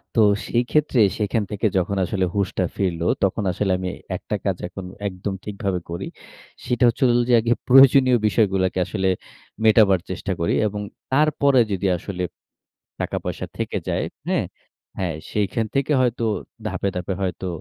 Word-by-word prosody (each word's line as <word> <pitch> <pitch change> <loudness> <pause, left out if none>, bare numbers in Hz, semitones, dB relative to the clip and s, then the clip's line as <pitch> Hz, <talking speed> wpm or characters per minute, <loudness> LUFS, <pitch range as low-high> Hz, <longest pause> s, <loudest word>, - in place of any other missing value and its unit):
তো 115 - +5 0.3
সেই 120 +1 +1
ক্ষেত্রে 150 -4 +2 0.2
সেখান 105 +1 0
থেকে 105 +1 0
যখন 95 +2 0
আসলে 95 +1 0
হুঁশটা 95 -2 0
ফিরলো, 85 -3 -1 0.2
তখন 100 +2 +1
আসলে 95 +1 -1
আমি 90 -1 -3 0.3
একটা - - -4
কাজ - - 0
এখন 95 +1 -8 0.2
একদম 95 +1 -4
ঠিকভাবে 100 -3 -2
করি। 85 - -4 0.6
সেটা 125 +1 0
হচ্ছে 120 +4 -2
হোল 120 - +3
যে, - - +4
আগে 120 +1 +2
প্রয়োজনীয় 130 -1 +7
বিষয়গুলাকে 95 -3 +1
আসলে 95 -2 -1 0.6
মেটাবার 105 -4 +5
চেষ্টা 95 +2 -4
করি 85 - +1
এবং 105 0 -4 0.3
তারপরে 140 -2 +3
যদি 95 0 0
আসলে 90 0 -5 0.8
টাকা - - -2
পয়সা - - -3
থেকে - - -2
যায়। - - 0 0.2
হ্যাঁ? - - +1 0.5
হ্যাঁ, 90 -5 -1 0.2
সেখান 105 +2 0
থেকে 140 +2 +1
হয়তো 120 -2 0 0.4
ধাপে, 100 - -1
ধাপে 90 +2 -3
হয়তো 95 0 -2
100 Hz, 155 wpm, -22 LUFS, 95-120 Hz, 0.8 s, প্রয়োজনীয়